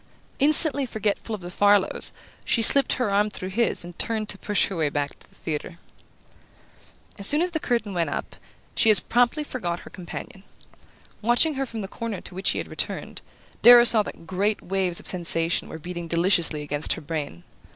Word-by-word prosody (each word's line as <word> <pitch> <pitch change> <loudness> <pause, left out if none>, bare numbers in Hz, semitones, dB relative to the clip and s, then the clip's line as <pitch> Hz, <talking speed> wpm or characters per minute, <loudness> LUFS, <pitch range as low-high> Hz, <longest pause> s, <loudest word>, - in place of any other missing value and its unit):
Instantly 285 -1 +2
forgetful 215 0 -2
of 200 - -11
the 175 0 -8
Farlows, 205 +1 +2 0.3
she 230 - +1
slipped 275 +5 +4
her 245 -5 -1
arm 205 +1 +2
through 185 -2 -6
his 230 -3 0
and 175 0 -12
turned 220 -2 -2
to 195 - 0
push 205 -3 +1
her 195 - -6
way 155 -3 0
back 145 0 -4
to - - -21
the - - -25
theatre. 160 +2 -5 1.4
As 200 - +5
soon 295 - +4
as 355 +2 0
the 320 - -2
curtain 230 -7 -2
went 170 -2 -1
up - - -5 0.4
she 225 - +3
as 215 - +9
promptly 245 +5 +1
forgot 180 -12 -4
her - - -13
companion. 185 +1 -9 0.8
Watching 240 +8 +3
her 270 -1 -3
from 225 -2 -6
the 195 - -5
corner 220 -1 -5
to - - -10
which 190 +2 -1
he - - 0
had - - -4
returned, - - -4 0.4
Darrow 240 0 +9
saw 230 -2 +6
that 185 - -8
great 200 +4 -1
waves 185 -2 0
of - - -13
sensation 170 -2 +1
were - - -7
beating 175 +1 -7
deliciously 170 -3 +1
against 145 +1 +1
her - - -8
brain. 145 - -5
200 Hz, 195 wpm, -24 LUFS, 175-230 Hz, 1.4 s, as